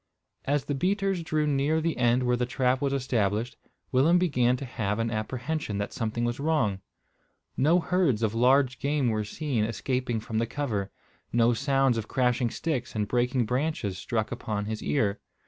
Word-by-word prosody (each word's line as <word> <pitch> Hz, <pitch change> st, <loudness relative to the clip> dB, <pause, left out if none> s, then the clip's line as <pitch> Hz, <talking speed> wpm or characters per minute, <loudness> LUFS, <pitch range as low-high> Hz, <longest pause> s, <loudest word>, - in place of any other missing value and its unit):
As 145 Hz, 0 st, 0 dB
the 145 Hz, -, -2 dB
beaters 195 Hz, +4 st, 0 dB
drew 155 Hz, -2 st, 0 dB
near 145 Hz, +2 st, +1 dB
the 165 Hz, 0 st, -1 dB
end 120 Hz, +1 st, +3 dB
where 125 Hz, 0 st, +2 dB
the 120 Hz, 0 st, -1 dB
trap 125 Hz, +1 st, +1 dB
was 140 Hz, -1 st, +1 dB
established, 120 Hz, -4 st, 0 dB, 0.4 s
Willem 145 Hz, +7 st, +4 dB
began 125 Hz, -8 st, +2 dB
to 135 Hz, -, -6 dB
have 105 Hz, -4 st, -2 dB
an 115 Hz, 0 st, -1 dB
apprehension 120 Hz, +2 st, -3 dB
that 100 Hz, 0 st, -3 dB
something 115 Hz, +1 st, -2 dB
was 120 Hz, +2 st, -2 dB
wrong. 140 Hz, -11 st, +1 dB, 0.7 s
No 160 Hz, +6 st, +4 dB
herds 165 Hz, -, +1 dB
of 110 Hz, -1 st, +1 dB
large 125 Hz, +2 st, +3 dB
game 140 Hz, -3 st, +1 dB
were 110 Hz, -1 st, 0 dB
seen 120 Hz, +1 st, -2 dB
escaping 120 Hz, +1 st, -1 dB
from 110 Hz, 0 st, -3 dB
the 115 Hz, -, 0 dB
cover. 110 Hz, -8 st, -2 dB, 0.4 s
No 120 Hz, 0 st, +4 dB
sounds 135 Hz, 0 st, +2 dB
of 110 Hz, -, -6 dB
crashing 125 Hz, -1 st, +1 dB
sticks 130 Hz, -4 st, -3 dB
and 105 Hz, -1 st, 0 dB
breaking 125 Hz, +1 st, +1 dB
branches 125 Hz, -6 st, -1 dB
struck 110 Hz, +1 st, -2 dB
upon 110 Hz, -4 st, -3 dB
his 110 Hz, 0 st, -4 dB
ear. 105 Hz, -8 st, 0 dB
125 Hz, 175 wpm, -27 LUFS, 110-145 Hz, 0.7 s, Willem